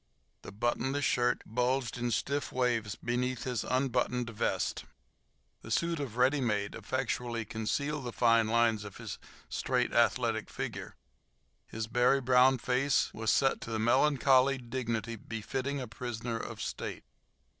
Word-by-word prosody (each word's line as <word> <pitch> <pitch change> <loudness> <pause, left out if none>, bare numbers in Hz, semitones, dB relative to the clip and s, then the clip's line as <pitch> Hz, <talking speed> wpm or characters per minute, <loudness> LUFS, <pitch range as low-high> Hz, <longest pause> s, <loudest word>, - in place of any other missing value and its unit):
The - - -9
buttonless 120 +6 -1
shirt 120 0 +1
bulged 125 +2 0
in 120 -1 -1
stiff 140 +5 -1
waves 120 -4 0
beneath 125 +1 -2
his 125 -3 -2
unbuttoned 125 -2 0
vest. 105 - -1 0.8
The - - -11
suit 170 +7 0
of 125 -5 -5
"ready 135 +3 +3
made" 105 -4 0
effectually 120 -2 -2
concealed 135 +7 -2
the 120 - -3
fine 115 -1 +4
lines 115 -1 +2
of 100 -2 -9
his - - -7 0.3
straight, - - 0
athletic - - +2
figure. - - -5 0.7
His 110 0 -4
berry 120 +4 +3
brown 130 0 +5
face 130 +3 +1
was 110 0 -2
set 135 -1 +2
to - - -7
the 110 - -1
melancholy 135 +3 +4
dignity 115 -2 -3
befitting 130 +6 -4
a 125 - -5
prisoner 120 -1 -4
of - - -6
state. - - -5
125 Hz, 140 wpm, -31 LUFS, 115-130 Hz, 0.8 s, brown